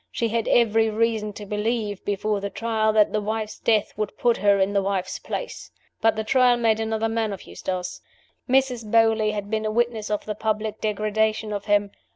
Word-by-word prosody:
She 230 Hz, -, -1 dB
had 230 Hz, 0 st, -1 dB
every 225 Hz, -1 st, +3 dB
reason 220 Hz, -1 st, 0 dB
to 205 Hz, -, -8 dB
believe 210 Hz, 0 st, -2 dB
(before 205 Hz, 0 st, -1 dB
the 200 Hz, -, -3 dB
Trial) 220 Hz, +1 st, 0 dB
that 215 Hz, -1 st, +4 dB
the 215 Hz, -, +1 dB
wife's 215 Hz, +1 st, -3 dB
death 215 Hz, -2 st, +1 dB
would 215 Hz, -1 st, -3 dB
put 240 Hz, -1 st, +2 dB
her 200 Hz, 0 st, +3 dB
in 195 Hz, +1 st, +1 dB
the 200 Hz, -, +2 dB
wife's 190 Hz, -1 st, -2 dB
place. -, -, -6 dB, 0.3 s
But 225 Hz, 0 st, +3 dB
the 220 Hz, -, -2 dB
Trial 250 Hz, +2 st, +4 dB
made 225 Hz, -2 st, +2 dB
another 220 Hz, 0 st, -1 dB
man 225 Hz, -1 st, -1 dB
of 195 Hz, -, -7 dB
Eustace. 185 Hz, -1 st, -5 dB, 0.5 s
Mrs. 260 Hz, -2 st, +2 dB
Beauly 225 Hz, -1 st, +3 dB
had 205 Hz, 0 st, -5 dB
been 220 Hz, 0 st, 0 dB
a -, -, 0 dB
witness 230 Hz, -1 st, -1 dB
of 210 Hz, -1 st, -2 dB
the 215 Hz, -, -3 dB
public 215 Hz, 0 st, -2 dB
degradation 215 Hz, 0 st, 0 dB
of 205 Hz, -1 st, -4 dB
him. 205 Hz, -1 st, +2 dB
215 Hz, 200 wpm, -24 LUFS, 205-225 Hz, 0.5 s, that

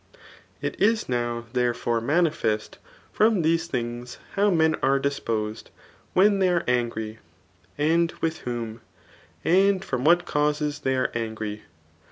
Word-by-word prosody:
It -, -, -4 dB
is 220 Hz, +1 st, +3 dB
now 120 Hz, -1 st, -2 dB
therefore 120 Hz, -2 st, 0 dB
manifest 145 Hz, -7 st, 0 dB, 0.3 s
from 215 Hz, -5 st, +3 dB
these 165 Hz, +1 st, +2 dB
things, 120 Hz, -3 st, -4 dB, 0.2 s
how 205 Hz, +1 st, +3 dB
men 160 Hz, -3 st, +3 dB
are 135 Hz, 0 st, +3 dB
disposed 115 Hz, -6 st, -2 dB, 0.4 s
when 200 Hz, +2 st, +4 dB
they 190 Hz, -1 st, +3 dB
are 175 Hz, -1 st, +1 dB
angry, 115 Hz, -3 st, -1 dB, 0.6 s
and 165 Hz, +3 st, +2 dB
with 165 Hz, 0 st, -1 dB
whom, 115 Hz, -2 st, -5 dB, 0.6 s
and 190 Hz, +2 st, +3 dB
from 125 Hz, -1 st, -2 dB
what 175 Hz, +3 st, +4 dB
causes 150 Hz, 0 st, 0 dB
they 130 Hz, -2 st, 0 dB
are 130 Hz, -, 0 dB
angry. 110 Hz, -2 st, -4 dB
140 Hz, 130 wpm, -25 LUFS, 120-170 Hz, 0.6 s, when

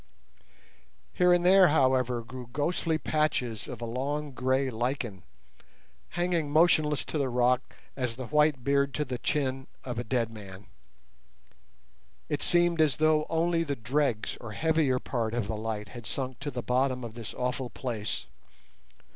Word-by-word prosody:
Here 180 Hz, -1 st, +4 dB
and 175 Hz, 0 st, +3 dB
there, 190 Hz, 0 st, +7 dB
however, 130 Hz, -5 st, +2 dB
grew 125 Hz, 0 st, -9 dB
ghostly 160 Hz, +3 st, 0 dB
patches 130 Hz, -9 st, -1 dB
of 120 Hz, -, -7 dB
a -, -, -2 dB
long 140 Hz, +5 st, -3 dB
grey 130 Hz, +1 st, 0 dB
lichen, 120 Hz, -4 st, -2 dB, 1.0 s
hanging 175 Hz, -4 st, 0 dB
motionless 155 Hz, -1 st, +3 dB
to 155 Hz, -, -3 dB
the 135 Hz, -2 st, 0 dB
rock 125 Hz, +1 st, +1 dB, 0.2 s
as 125 Hz, -3 st, -2 dB
the 130 Hz, +1 st, -6 dB
white 150 Hz, -1 st, +2 dB
beard 140 Hz, -1 st, +2 dB
to 150 Hz, -, 0 dB
the 125 Hz, -2 st, -4 dB
chin 135 Hz, -2 st, -1 dB, 0.2 s
of 120 Hz, -2 st, -4 dB
a -, -, -2 dB
dead 115 Hz, -1 st, 0 dB
man. 100 Hz, -2 st, -10 dB, 1.6 s
It -, -, -1 dB
seemed 175 Hz, -1 st, +3 dB
as 150 Hz, -5 st, +3 dB
though 155 Hz, 0 st, +3 dB
only 165 Hz, +1 st, +1 dB
the 145 Hz, -3 st, -2 dB
dregs 120 Hz, -1 st, -1 dB
or 110 Hz, -2 st, -7 dB
heavier 155 Hz, 0 st, +2 dB
part 115 Hz, -3 st, -2 dB
of 120 Hz, -5 st, -1 dB
the 110 Hz, -, -2 dB
light 105 Hz, -1 st, -4 dB
had 120 Hz, -1 st, -8 dB
sunk 130 Hz, +2 st, -3 dB
to 145 Hz, -, -4 dB
the 125 Hz, -3 st, -5 dB
bottom 130 Hz, 0 st, +1 dB
of 115 Hz, -2 st, -6 dB
this 115 Hz, -2 st, -7 dB
awful 125 Hz, 0 st, -2 dB
place. 115 Hz, -6 st, -4 dB
130 Hz, 155 wpm, -29 LUFS, 120-150 Hz, 1.6 s, there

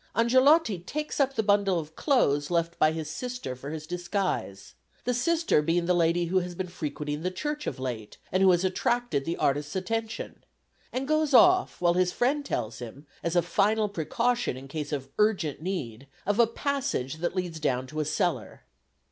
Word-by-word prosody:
Angelotti 255 Hz, -, +4 dB
takes 300 Hz, -, -4 dB
up 270 Hz, -1 st, +2 dB
the 220 Hz, -, +1 dB
bundle 200 Hz, -2 st, +3 dB
of 160 Hz, -1 st, -6 dB
clothes 145 Hz, -, +2 dB
left 170 Hz, -1 st, -1 dB
by 155 Hz, -, +5 dB
his 160 Hz, -1 st, -4 dB
sister 245 Hz, -, -5 dB
for 135 Hz, +3 st, -8 dB
his 155 Hz, 0 st, -6 dB
disguise 175 Hz, -, -3 dB, 0.3 s
the 250 Hz, -, 0 dB
sister 330 Hz, -, +2 dB
being 170 Hz, +3 st, +1 dB
the 180 Hz, -, +3 dB
lady 170 Hz, 0 st, +2 dB
who 185 Hz, +3 st, +2 dB
has 180 Hz, -1 st, -5 dB
been 185 Hz, -, -3 dB
frequenting 150 Hz, -3 st, -4 dB
the 180 Hz, -, 0 dB
church 295 Hz, +10 st, -4 dB
of -, -, -3 dB
late, 120 Hz, -5 st, -5 dB
and 185 Hz, -, +1 dB
who 190 Hz, -, +6 dB
has 175 Hz, 0 st, +3 dB
attracted 235 Hz, -, 0 dB
the 170 Hz, -, -2 dB
artist's 145 Hz, +3 st, 0 dB
attention 220 Hz, +4 st, -3 dB, 0.5 s
and 260 Hz, +1 st, -3 dB
goes 310 Hz, -2 st, +2 dB
off, 360 Hz, +5 st, +5 dB
while 175 Hz, -1 st, +4 dB
his 180 Hz, 0 st, +2 dB
friend 275 Hz, +7 st, +1 dB
tells 110 Hz, -2 st, -3 dB
him, 125 Hz, +5 st, -9 dB, 0.2 s
as 170 Hz, +1 st, -2 dB
a 175 Hz, -, +4 dB
final 210 Hz, +4 st, +2 dB
precaution 205 Hz, -, -1 dB
in 135 Hz, +1 st, -10 dB
case 150 Hz, +2 st, -5 dB
of 135 Hz, -2 st, -4 dB
urgent 190 Hz, -10 st, +1 dB
need, 140 Hz, -, -4 dB, 0.2 s
of 205 Hz, +3 st, 0 dB
a 235 Hz, -, +6 dB
passage 230 Hz, -, -2 dB
that 175 Hz, +3 st, -2 dB
leads 175 Hz, -3 st, -3 dB
down 130 Hz, -4 st, 0 dB
to 155 Hz, +4 st, -6 dB
a 155 Hz, -, 0 dB
cellar. -, -, -2 dB
180 Hz, 190 wpm, -27 LUFS, 150-230 Hz, 0.5 s, who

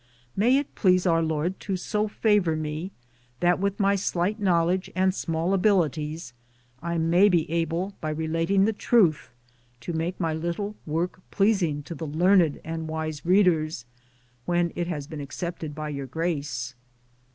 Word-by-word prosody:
May 240 Hz, +7 st, +4 dB
it 285 Hz, 0 st, -3 dB
please 185 Hz, -2 st, +3 dB
our 165 Hz, -2 st, +3 dB
Lord 160 Hz, +3 st, -1 dB
to 195 Hz, -2 st, -3 dB
so 210 Hz, +3 st, -1 dB
favor 205 Hz, -6 st, +2 dB
me 155 Hz, +4 st, -4 dB, 0.5 s
that 175 Hz, 0 st, +3 dB
with 200 Hz, +2 st, -1 dB
my 200 Hz, 0 st, +3 dB
slight 195 Hz, +2 st, -1 dB
knowledge 185 Hz, -1 st, +1 dB
and 185 Hz, 0 st, +2 dB
small 165 Hz, 0 st, -1 dB
abilities 165 Hz, -7 st, +1 dB, 0.5 s
I 170 Hz, +1 st, -2 dB
may 170 Hz, +5 st, +4 dB
be 170 Hz, -4 st, +2 dB
able 170 Hz, +4 st, -1 dB
by 155 Hz, -, -2 dB
relating 165 Hz, +5 st, +1 dB
the 220 Hz, -, +1 dB
truth 180 Hz, -, +2 dB, 0.5 s
to 170 Hz, -, -5 dB
make 165 Hz, +3 st, -2 dB
my 165 Hz, -3 st, 0 dB
little 170 Hz, +6 st, -3 dB
work 170 Hz, +4 st, -2 dB
pleasing 190 Hz, -8 st, +1 dB
to 170 Hz, -, -7 dB
the 160 Hz, -1 st, -6 dB
learned 170 Hz, +1 st, +3 dB
and 160 Hz, 0 st, -4 dB
wise 155 Hz, -1 st, -4 dB
readers, 165 Hz, -8 st, +3 dB, 0.6 s
when 175 Hz, -1 st, +1 dB
it 175 Hz, -1 st, -2 dB
has 150 Hz, -5 st, -3 dB
been 150 Hz, 0 st, -7 dB
accepted 155 Hz, +1 st, -5 dB
by 155 Hz, 0 st, -4 dB
your 140 Hz, -2 st, -5 dB
grace. 140 Hz, -5 st, -3 dB
170 Hz, 155 wpm, -26 LUFS, 155-190 Hz, 0.6 s, May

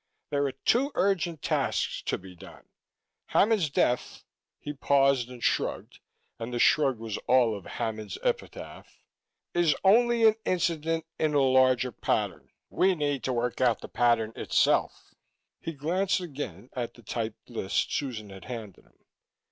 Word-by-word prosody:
There 145 Hz, -1 st, +1 dB
are -, -, -2 dB
two 245 Hz, -, +1 dB
urgent 175 Hz, -5 st, 0 dB
tasks -, -, 0 dB
to -, -, 0 dB
be 90 Hz, -1 st, -13 dB
done. -, -, -14 dB, 0.7 s
Hammond's 205 Hz, -7 st, +4 dB
death 125 Hz, -2 st, 0 dB, 0.2 s
" -, -, -63 dB
he 145 Hz, -, -6 dB
paused 140 Hz, -3 st, +2 dB
and 125 Hz, -2 st, -10 dB
shrugged, -, -, -1 dB, 0.4 s
and 115 Hz, +1 st, -5 dB
the 120 Hz, -, -2 dB
shrug 135 Hz, 0 st, +4 dB
was 110 Hz, -2 st, -5 dB
all 125 Hz, -4 st, +4 dB
of 100 Hz, -, -9 dB
Hammond's 110 Hz, -3 st, -4 dB
epitaph -, -, -4 dB, 0.5 s
"is 175 Hz, -3 st, +3 dB
only 230 Hz, +3 st, +5 dB
an 220 Hz, -, +7 dB
incident 165 Hz, -3 st, 0 dB
in 155 Hz, -1 st, +1 dB
a 140 Hz, -, +4 dB
larger 130 Hz, -1 st, +3 dB
pattern; -, -, -2 dB, 0.2 s
we 190 Hz, 0 st, +3 dB
need 145 Hz, -4 st, -1 dB
to 130 Hz, -, 0 dB
work 120 Hz, +1 st, -2 dB
out 120 Hz, -3 st, +3 dB
the -, -, -7 dB
pattern 115 Hz, -2 st, +2 dB
itself." -, -, +1 dB, 0.5 s
He 165 Hz, -, -5 dB
glanced 180 Hz, +7 st, 0 dB
again 135 Hz, -, -7 dB
at 120 Hz, -2 st, -4 dB
the 120 Hz, -, -16 dB
typed 110 Hz, +1 st, -5 dB
list 100 Hz, -5 st, -1 dB
Susan 110 Hz, -8 st, -3 dB
had 95 Hz, -1 st, -11 dB
handed 110 Hz, -6 st, -8 dB
him. -, -, -31 dB
135 Hz, 155 wpm, -28 LUFS, 115-165 Hz, 0.7 s, an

